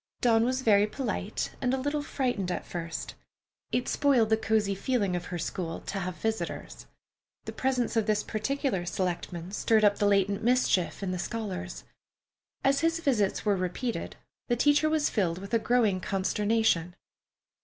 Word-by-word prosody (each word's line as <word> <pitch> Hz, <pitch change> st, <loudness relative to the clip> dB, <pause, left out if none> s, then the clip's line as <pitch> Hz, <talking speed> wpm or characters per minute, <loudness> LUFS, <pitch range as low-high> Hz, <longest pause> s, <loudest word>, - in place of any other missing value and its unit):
Dawn 230 Hz, -2 st, +4 dB
was 255 Hz, +1 st, -1 dB
very 210 Hz, -2 st, +5 dB
polite 215 Hz, -4 st, -3 dB
and 255 Hz, 0 st, +1 dB
a -, -, -3 dB
little 290 Hz, +3 st, -1 dB
frightened 245 Hz, -10 st, -1 dB
at 180 Hz, -, -3 dB
first. 170 Hz, -1 st, -5 dB, 0.6 s
It 245 Hz, 0 st, 0 dB
spoiled 255 Hz, -7 st, +3 dB
the -, -, +7 dB
cosy 215 Hz, -2 st, +1 dB
feeling 200 Hz, -2 st, 0 dB
of 175 Hz, 0 st, -3 dB
her 175 Hz, -, -4 dB
school 165 Hz, 0 st, -3 dB
to 195 Hz, -, -4 dB
have 185 Hz, -1 st, -3 dB
visitors. 220 Hz, +2 st, -4 dB, 0.6 s
The -, -, -4 dB
presence 255 Hz, -2 st, 0 dB
of 225 Hz, -2 st, +1 dB
this 210 Hz, -1 st, +2 dB
particular 235 Hz, -, -1 dB
selectman 175 Hz, -1 st, -3 dB
stirred 215 Hz, +1 st, +2 dB
up 205 Hz, 0 st, +3 dB
the 205 Hz, -, +3 dB
latent 200 Hz, 0 st, +2 dB
mischief 235 Hz, -7 st, +2 dB
in 190 Hz, -, -1 dB
the 180 Hz, -, -3 dB
scholars. 190 Hz, -4 st, -4 dB, 0.8 s
As 275 Hz, +1 st, +3 dB
his 330 Hz, 0 st, +1 dB
visits 235 Hz, -13 st, +1 dB
were 205 Hz, -1 st, +3 dB
repeated, 185 Hz, +6 st, -3 dB, 0.3 s
the 240 Hz, -, +2 dB
teacher 290 Hz, +5 st, +3 dB
was 310 Hz, -1 st, +1 dB
filled 175 Hz, -6 st, 0 dB
with 195 Hz, +4 st, -9 dB
a 230 Hz, -, +4 dB
growing 220 Hz, -5 st, +2 dB
consternation. 195 Hz, -2 st, +1 dB
215 Hz, 165 wpm, -28 LUFS, 185-250 Hz, 0.8 s, the